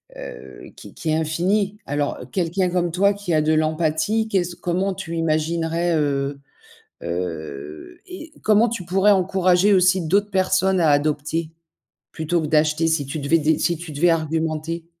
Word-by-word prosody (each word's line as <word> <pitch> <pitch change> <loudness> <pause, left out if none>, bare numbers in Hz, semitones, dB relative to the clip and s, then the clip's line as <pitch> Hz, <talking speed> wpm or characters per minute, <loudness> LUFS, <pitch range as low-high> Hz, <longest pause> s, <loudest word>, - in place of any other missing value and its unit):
est, - - -11
heu, 60 0 -10
qui - - -12
qui 160 - -5
est 155 - +2
infinie. 190 +6 0
Alors, 145 0 -2
quelqu'un 180 +1 0
comme 175 -1 0
toi 200 +4 +3
qui 200 -4 -4
a 155 - +3
de 155 +1 +1
l'empathie, 160 +8 0
qu'est-ce 180 -3 -1
q 180 - -30
comment 185 +2 -1
tu 170 -3 -6
imaginerais, 165 +1 0
heu 140 -1 -1 0.6
heu 80 -4 -6
et 330 -4 -9
comment 215 +2 +4
tu 220 -5 -5
pourrais 190 +4 +2
encourager 190 +1 +3
aussi 185 0 +4
d'autres 200 +5 +1
personnes 190 0 +2
à 160 - +4
adopter 150 +2 0 0.6
plutôt 160 +2 -1
que 155 - -3
d'acheter 155 +1 +2
si 160 -4 0
tu 140 +3 -5
devais 145 +4 +2
dé 155 0 +1
si 170 - +1
tu 170 -1 -9
devais 155 +4 +2
argumenter? 160 0 -1
165 Hz, 170 wpm, -22 LUFS, 155-185 Hz, 0.6 s, comment